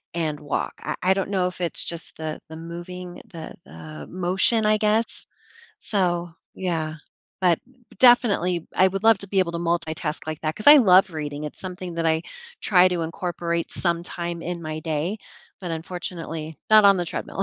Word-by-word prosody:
and 155 Hz, -3 st, -1 dB
walk, 145 Hz, -1 st, -2 dB
I -, -, -3 dB
I 185 Hz, +1 st, +5 dB
don't 195 Hz, 0 st, -2 dB
know 190 Hz, -3 st, +1 dB
if 180 Hz, 0 st, -7 dB
it's 170 Hz, -, -2 dB
just 170 Hz, -1 st, -6 dB
the 155 Hz, -1 st, -5 dB
the 160 Hz, -, -8 dB
moving, 175 Hz, +2 st, -8 dB
the 165 Hz, -2 st, -8 dB
the 80 Hz, -2 st, -10 dB
motion, 185 Hz, +5 st, +1 dB
I 215 Hz, 0 st, +4 dB
guess? 215 Hz, +2 st, 0 dB, 0.5 s
So, 175 Hz, -, -1 dB, 0.2 s
yeah. 165 Hz, -4 st, -2 dB, 0.4 s
But, 175 Hz, -3 st, +4 dB, 0.4 s
definitely, 200 Hz, -9 st, +4 dB
I 185 Hz, -, +6 dB
would 195 Hz, +1 st, -4 dB
love 225 Hz, -2 st, +6 dB
to 200 Hz, -, -5 dB
be 195 Hz, 0 st, +2 dB
able 180 Hz, -2 st, +1 dB
to 170 Hz, -, -3 dB
multitask 165 Hz, -2 st, -2 dB
like 155 Hz, -1 st, -4 dB
that 155 Hz, 0 st, -1 dB
'cause 215 Hz, -, -8 dB
I 295 Hz, -, +11 dB
love 190 Hz, -7 st, +6 dB
reading, 150 Hz, -1 st, -4 dB
it's 150 Hz, -, -7 dB
something 180 Hz, -1 st, -6 dB
that 165 Hz, 0 st, -2 dB
I 160 Hz, 0 st, +2 dB, 0.4 s
try 185 Hz, -3 st, +5 dB
to 180 Hz, -2 st, -1 dB
incorporate 170 Hz, 0 st, -3 dB
sometime 170 Hz, -1 st, -2 dB
in 175 Hz, 0 st, -4 dB
my 155 Hz, 0 st, -4 dB
day, 160 Hz, +5 st, -2 dB, 0.4 s
but 180 Hz, -3 st, -5 dB
unfortunately, 165 Hz, -2 st, -5 dB
not 215 Hz, -1 st, +8 dB
on 200 Hz, -1 st, +7 dB
the 175 Hz, -, 0 dB
treadmill. 190 Hz, -, -4 dB
175 Hz, 180 wpm, -24 LUFS, 160-190 Hz, 0.5 s, I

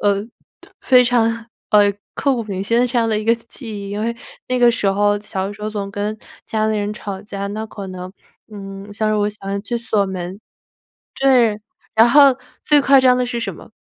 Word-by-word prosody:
呃， 200 Hz, 0 st, +1 dB, 0.5 s
非 250 Hz, -1 st, +5 dB
常， 230 Hz, -2 st, +1 dB, 0.2 s
呃， 205 Hz, -1 st, +5 dB, 0.2 s
刻 275 Hz, -2 st, +1 dB
骨 235 Hz, -, -2 dB
铭 195 Hz, -2 st, -4 dB
心 230 Hz, +3 st, +2 dB
的 250 Hz, -, +3 dB
这 245 Hz, 0 st, 0 dB
样 230 Hz, -1 st, +2 dB
的 215 Hz, -1 st, +1 dB
一 215 Hz, -, -5 dB
个 230 Hz, +1 st, +4 dB
记 235 Hz, +2 st, -12 dB
忆。 200 Hz, -2 st, -6 dB
因 205 Hz, -, -3 dB
为 230 Hz, +2 st, -2 dB, 0.3 s
那 255 Hz, 0 st, 0 dB
个 240 Hz, -1 st, +6 dB
时 230 Hz, -, -1 dB
候 205 Hz, +1 st, +2 dB
小 195 Hz, -2 st, -4 dB
的 205 Hz, -, -5 dB
时 210 Hz, -, -14 dB
候 215 Hz, -, -2 dB
总 200 Hz, -2 st, -4 dB
跟 205 Hz, +2 st, -3 dB, 0.3 s
家 215 Hz, -1 st, 0 dB
里 220 Hz, 0 st, 0 dB
人 205 Hz, 0 st, -2 dB
吵 195 Hz, -3 st, -6 dB
架， 200 Hz, -1 st, -5 dB
那 215 Hz, +2 st, -4 dB
可 205 Hz, -2 st, -8 dB
能 185 Hz, 0 st, -7 dB, 0.4 s
嗯， 195 Hz, 0 st, -9 dB
像 215 Hz, +1 st, -1 dB
是 215 Hz, -, +1 dB
我 205 Hz, 0 st, +1 dB
喜 210 Hz, -, -7 dB
欢 195 Hz, +1 st, -4 dB
去 235 Hz, +3 st, -3 dB
锁 215 Hz, -3 st, 0 dB
门 185 Hz, +1 st, -6 dB, 0.8 s
对。 240 Hz, -6 st, +4 dB, 0.3 s
然 225 Hz, +2 st, +6 dB
后， 280 Hz, -2 st, +7 dB, 0.3 s
最 295 Hz, -1 st, +4 dB
夸 270 Hz, 0 st, +6 dB
张 255 Hz, -1 st, +5 dB
的 250 Hz, -, +1 dB
是 240 Hz, -1 st, -3 dB
什 -, -, -4 dB
么？ -, -, -14 dB
215 Hz, 240 characters per minute, -19 LUFS, 200-235 Hz, 0.8 s, 后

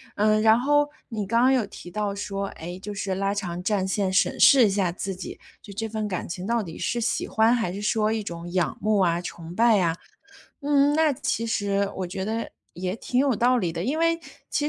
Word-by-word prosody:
呃， 215 Hz, +1 st, +3 dB
然 220 Hz, +1 st, +5 dB
后 290 Hz, +2 st, +2 dB, 0.2 s
你 215 Hz, -4 st, -4 dB
刚 230 Hz, +3 st, +2 dB
刚 260 Hz, +2 st, +5 dB
有 255 Hz, -3 st, +2 dB
提 175 Hz, -3 st, -11 dB
到 205 Hz, 0 st, -2 dB
说， 200 Hz, -1 st, -3 dB
哎， 175 Hz, 0 st, -8 dB
就 210 Hz, -, -6 dB
是” 195 Hz, -1 st, -3 dB
拉 195 Hz, +1 st, 0 dB
长 180 Hz, -3 st, -4 dB
战 195 Hz, -1 st, 0 dB
线 190 Hz, -1 st, 0 dB
审 185 Hz, -, +1 dB
视 265 Hz, -4 st, +7 dB
一 205 Hz, -, +3 dB
下 190 Hz, -3 st, +1 dB
自 190 Hz, +2 st, -4 dB
己， 185 Hz, -, -8 dB, 0.2 s
就 205 Hz, -, -12 dB
这 225 Hz, +2 st, -3 dB
份 215 Hz, -1 st, -3 dB
感 185 Hz, -3 st, -4 dB
情 180 Hz, +3 st, -5 dB
到 235 Hz, -1 st, +1 dB
底 165 Hz, -4 st, -8 dB
是 240 Hz, -, -1 dB
喜 235 Hz, -, -1 dB
欢， 225 Hz, +2 st, +3 dB
还 225 Hz, -7 st, -1 dB
是 200 Hz, +2 st, -6 dB
说 215 Hz, 0 st, +1 dB
一 220 Hz, -1 st, -1 dB
种 170 Hz, -1 st, -7 dB
仰 180 Hz, -4 st, 0 dB
慕 215 Hz, -1 st, +2 dB
啊、 170 Hz, -2 st, +2 dB
崇 170 Hz, -1 st, -8 dB
拜 225 Hz, +1 st, +4 dB
啊。 170 Hz, -2 st, +1 dB, 0.7 s
“嗯， 285 Hz, 0 st, +3 dB
那 315 Hz, -2 st, +4 dB
其 285 Hz, -3 st, -2 dB
实 200 Hz, -2 st, 0 dB
我 185 Hz, -2 st, -2 dB
觉 190 Hz, +1 st, -4 dB
得 225 Hz, +2 st, -3 dB, 0.2 s
也 185 Hz, +2 st, -3 dB
挺 250 Hz, +2 st, -1 dB
有 270 Hz, -4 st, +3 dB
道 250 Hz, +3 st, +3 dB
理 175 Hz, -7 st, -1 dB
的， 170 Hz, +1 st, -3 dB
因 295 Hz, +8 st, -1 dB
为 330 Hz, 0 st, +3 dB, 0.3 s
其 295 Hz, -, 0 dB
210 Hz, 245 characters per minute, -25 LUFS, 185-235 Hz, 0.7 s, 视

